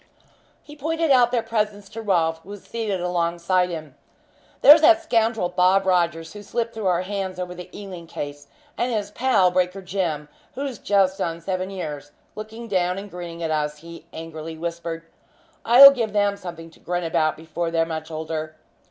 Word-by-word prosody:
He 295 - -13
pointed 320 +1 -1
out 250 -3 +6
their 240 -2 +1
presence 210 -3 -2
to 225 - -7
Rolfe, 165 -6 +1
who 175 - -18
was 205 -1 -9
seated 215 -5 -3
alongside 175 +1 0
him. 155 -5 -7 0.7
"There's 300 +2 +10
that 330 +1 +6
scoundrel 225 - +1
Bob 185 +2 +3
Rogers, 170 -3 +1
who 205 - -9
slipped 230 +3 -3
through 220 -3 -3
our 180 0 +2
hands 190 -1 -4
over 180 -1 -4
the 180 0 -10
Ealing 185 -5 -9
case, 145 -2 -7 0.3
and 245 +1 0
his 205 -3 -2
pal, 210 -7 +3
Breaker 180 +1 0
Jim, 170 -6 -2 0.3
who's 270 -4 -4
just 195 -2 +2
done 165 0 -2
seven 185 +2 -3
years, 150 -6 -6 0.2
looking 220 +2 -8
down 180 -3 0
and 200 0 -8
grinning 170 -1 -7
at 160 - -1
us," 150 -1 -1
he 170 +1 -12
angrily 160 0 -8
whispered. 170 0 -5 0.6
"I'll 260 +4 +10
give 230 -6 -2
them 205 -1 +2
something 170 -4 -9
to - - -21
grin 175 0 -3
about 155 -1 +1
before 165 +2 -4
they're 165 0 +1
much 160 -1 -5
older. 155 0 -5
180 Hz, 180 wpm, -23 LUFS, 165-210 Hz, 0.7 s, There's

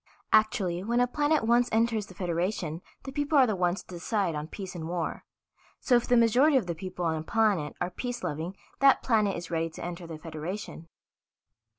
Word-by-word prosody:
"Actually, 210 -5 +3
when 235 +3 +1
a 245 - +5
planet 295 +2 +1
once 240 +2 +3
enters 225 -2 +1
the 185 - -13
Federation 175 -2 -2 0.2
the 270 - -6
people 290 +2 +1
are 265 - +7
the 215 -4 0
ones 180 0 0
to - - -38
decide 180 0 -1
on 150 0 -4
peace 190 +2 -7
and 165 -3 -6
war. 175 -2 -3 0.5
So 250 - +3
if 240 - +2
the 245 - +4
majority 250 +6 +5
of 240 - 0
the 175 - -2
people 180 +1 -5
on 160 -1 +1
a - - -3
planet 200 -4 +1
are 180 - -2
peace 245 +6 -5
loving 160 +6 -4 0.2
that 275 -1 +5
planet 215 -5 +2
is 170 0 -7
ready 165 0 0
to 160 - -8
enter 175 0 -6
the 160 -1 -7
Federation." 165 +2 -6
190 Hz, 205 wpm, -28 LUFS, 170-235 Hz, 0.5 s, are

